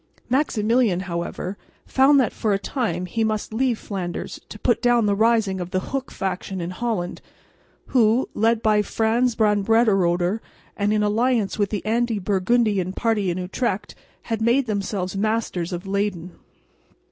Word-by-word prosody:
Maximilian, 230 -7 +2
however, 180 +2 -4 0.3
found 275 +2 +4
that 245 -6 +1
for 215 -3 0
a - - +2
time 195 - -2
he 225 +5 -1
must 215 0 -2
leave 245 0 +1
Flanders 185 -5 -5
to - - -8
put - - +1
down 240 -2 +3
the 205 - +2
rising 220 -2 +2
of 175 - -5
the 185 - 0
Hook 275 -1 -2
faction 190 0 -4
in 170 +1 -4
Holland, 200 -4 -3 0.7
who, 235 0 +3
led 225 +1 +1
by 215 -1 +4
Frans 225 +3 +1
van 210 -2 +2
Brederode, 195 -4 +2 0.4
and 205 0 0
in 215 0 +2
alliance 220 0 +1
with 205 -1 +2
the 205 -2 -4
anti 230 0 +1
Burgundian 200 -1 +1
party 215 -3 0
in 175 - -2
Utrecht, 185 +3 -2 0.3
had 225 -1 -3
made 240 +4 +3
themselves 200 -3 -2
masters 205 -4 -1
of 175 +1 -5
Leyden. 195 -3 -2
210 Hz, 155 wpm, -23 LUFS, 190-230 Hz, 0.7 s, found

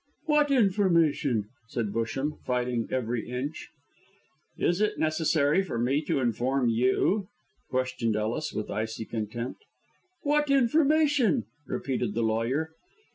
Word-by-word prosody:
"What 300 -2 +3
information?" 170 - +2 0.2
said 115 -4 -3
Busham, 135 +6 -2
fighting 125 -2 -1
every 120 -2 -2
inch. 130 +5 -4 0.9
"Is 175 +3 +1
it 210 0 +1
necessary 155 +1 +2
for 190 -11 -4
me 130 +5 +1
to - - +1
inform 125 +1 +1
you?" 130 - +2 0.4
questioned 125 -3 -1
Ellis, 110 +8 -2
with 105 - -4
icy 110 +1 -3
contempt. 115 - -5 0.6
"What 295 0 +2
information?" 275 - +3 0.2
repeated 125 -5 -2
the 115 - +1
lawyer. 115 +8 0
130 Hz, 115 wpm, -28 LUFS, 115-190 Hz, 0.9 s, What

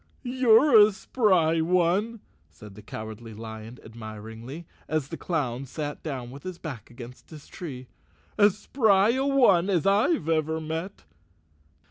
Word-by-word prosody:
"You're 245 0 +5
a 210 +1 +7
spry 185 -8 +2
one," 180 +6 +1 0.3
said 105 +5 -14
the 105 - -12
Cowardly 110 +2 -8
Lion 110 +2 -9
admir¬ 110 -1 -9
ingly, 135 +9 -9 0.2
as 155 -3 -2
the - - -5
clown 135 -7 -3
sat 145 +2 -5
down 130 -6 -5
with 140 +2 -10
his 185 -2 -7
back 145 -10 -8
against 120 +3 -12
a 150 -2 -12
tree, 130 -8 -8 0.3
" - - -35
as 205 -1 +5
spry 215 -4 +3
a 265 +3 0
one 205 -10 +4
as 175 -6 +1
I've 200 - +2
ever 160 0 0
met." 160 +5 -5
160 Hz, 150 wpm, -26 LUFS, 120-200 Hz, 0.3 s, a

